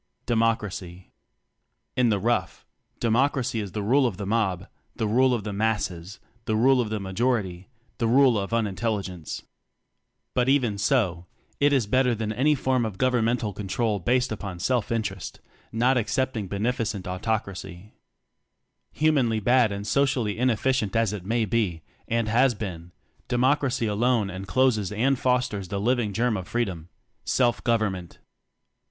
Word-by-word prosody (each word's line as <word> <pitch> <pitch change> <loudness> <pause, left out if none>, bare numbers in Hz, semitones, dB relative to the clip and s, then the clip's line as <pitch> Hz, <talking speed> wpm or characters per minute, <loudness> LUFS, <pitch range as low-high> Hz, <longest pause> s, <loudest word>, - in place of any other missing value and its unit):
Democracy. 105 -6 -1 0.8
In 125 -2 +3
the 105 - +2
rough, 120 +5 -1 0.3
Democracy 125 +1 +1
is 100 -4 -5
the 105 - -3
ule 130 +5 +3
of 105 - -4
the 100 - -4
mob, 95 -4 0 0.3
the 110 - -1
rule 130 +5 +3
of 120 -4 -1
the 105 -1 -4
asses, 100 -3 -2 0.3
the 110 - 0
rule 130 +3 +4
of 115 - -3
the 110 0 -2
majority 95 -2 -1 0.3
the 115 - +1
ule 130 +1 +5
of 100 0 -2
un 115 -1 +1
intelligence. 100 -5 -3 0.9
But 125 +1 +2
even 120 -7 +2
so, 95 -8 +1 0.3
t 145 - +4
is 135 -5 +2
better 125 +2 +2
than 110 0 -3
any 150 +6 +3
form 130 -2 +1
of 110 -4 -4
govern 125 -2 +2
mental 115 -3 0
control 105 +2 -1
based 125 +8 +1
upon 100 -4 -5
self 120 +5 0
inter 110 -4 0
est - - -8 0.3
not 125 +3 +2
excepting 125 -2 -1
"Beneficent 105 0 -2
Autoc 105 +4 -1
racy." 95 +1 -10 1.0
Humanly 135 -8 +2
bad 120 0 +3
and 100 0 -5
socially 130 -3 +1
ineffi 125 +1 +2
cient 105 -1 -4
as 115 -2 +2
it 95 -4 -6
may 115 0 +1
be, 95 -7 -1 0.2
and 115 -1 0
has 120 +3 +3
been, 90 -5 -6 0.4
De 125 - -1
ocracy 130 -2 +2
alone 110 -1 +1
encloses 105 +2 +1
and 125 +5 +1
fosters 125 -6 0
he - - -4
living 115 +1 +1
germ 115 +1 0
of 95 -1 -6
freedom 95 -9 -3 0.3
self 120 -2 +1
gov 115 -1 +3
ernment. 95 -5 -4
110 Hz, 160 wpm, -25 LUFS, 100-125 Hz, 1.0 s, ule